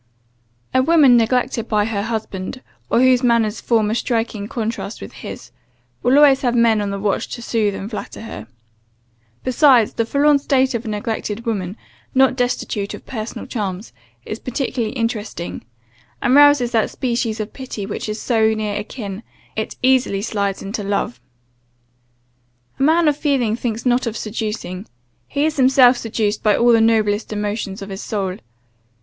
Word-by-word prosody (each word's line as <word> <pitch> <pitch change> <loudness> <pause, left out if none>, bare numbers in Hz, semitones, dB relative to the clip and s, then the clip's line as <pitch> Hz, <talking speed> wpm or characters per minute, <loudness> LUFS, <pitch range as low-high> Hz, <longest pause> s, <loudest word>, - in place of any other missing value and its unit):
"A 260 - +4
woman 285 -3 +5
neglected 240 0 +1
by 210 -1 +1
her 215 -2 -2
husband, 220 +1 -4 0.3
or 235 - +3
whose 255 -1 +5
manners 235 -3 +2
form 220 -3 +1
a - - +1
striking 225 -3 -1
contrast 225 -1 -4
with - - -9
his, - - -9 0.5
will 250 +3 +3
always 280 -2 +6
have 245 -2 +1
men 230 -2 +4
on 205 - -2
the 200 - -3
watch 200 0 -1
to 240 - -9
soothe 215 -4 0
and 195 - -5
flatter 215 -1 -7
her. 225 - -8 1.0
Besides, 255 -3 +4
the 230 - 0
forlorn 285 +2 +3
state 265 -2 +2
of 235 +1 -3
a - - -5
neglected 215 +1 -3
woman, 200 -3 -3 0.4
not 265 0 +4
destitute 245 -5 -2
of - - -14
personal 220 -3 -6
charms, 200 - -4 0.3
is 215 - -5
particularly 250 -2 -3
interesting, 225 - -3 0.6
and 250 - +1
rouses 290 -4 +6
that 225 -2 +2
species 235 -3 -2
of 215 0 -5
pity, 255 -6 -6
which 215 - -5
is 215 +1 -3
so 220 -2 +2
near 210 -1 -2
akin, 205 -2 -6 0.3
it 220 - -3
easily 255 -6 +2
slides 200 -3 -2
into 200 +2 -4
love. 195 -12 -2 1.6
A - - -4
man 320 +3 +4
of 295 - +3
feeling 270 -7 +1
thinks 230 -1 -4
not 250 0 +2
of 230 - -3
seducing, 210 -3 -4 0.4
he 285 +1 0
is 310 -1 -1
himself 260 -1 +6
seduced 220 -3 -2
by 210 -1 +3
all 240 0 +4
the 230 -1 +5
noblest 220 -2 +2
emotions 205 -1 -3
of 195 - -9
his 195 0 -6
soul. 195 -3 -3
225 Hz, 165 wpm, -20 LUFS, 210-255 Hz, 1.6 s, always